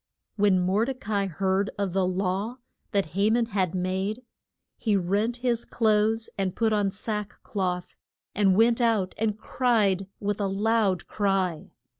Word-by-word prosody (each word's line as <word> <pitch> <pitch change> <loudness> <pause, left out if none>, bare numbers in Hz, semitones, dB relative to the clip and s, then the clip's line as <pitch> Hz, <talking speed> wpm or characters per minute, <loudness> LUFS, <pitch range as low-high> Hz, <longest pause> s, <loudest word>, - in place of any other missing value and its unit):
When 200 -3 +3
Mor 190 +5 +2
de 265 +1 -3
ca 220 -4 -6
i 200 -1 +2
heard 190 +3 0
of 200 -3 -1
the 190 -1 +2
law 190 +5 -1 0.3
that 195 -6 0
Ha 200 +3 +2
man 235 +1 +3
had 190 -5 -1
made, 190 +6 -2 0.5
he 215 -3 0
rent 205 +6 0
his 235 -2 +1
clothes 220 0 +1
and 190 -1 -1
put 225 -2 +1
on 205 -2 +2
sack 210 +1 -4
cloth, 180 -3 -3 0.4
and 195 -2 +3
went 230 +3 +4
out 220 -6 +2
and 215 -1 0
cried 215 -5 +1
with 205 0 -2
a 200 - +1
loud 200 -2 +1
cry. 195 -5 -1
200 Hz, 160 wpm, -26 LUFS, 190-220 Hz, 0.5 s, went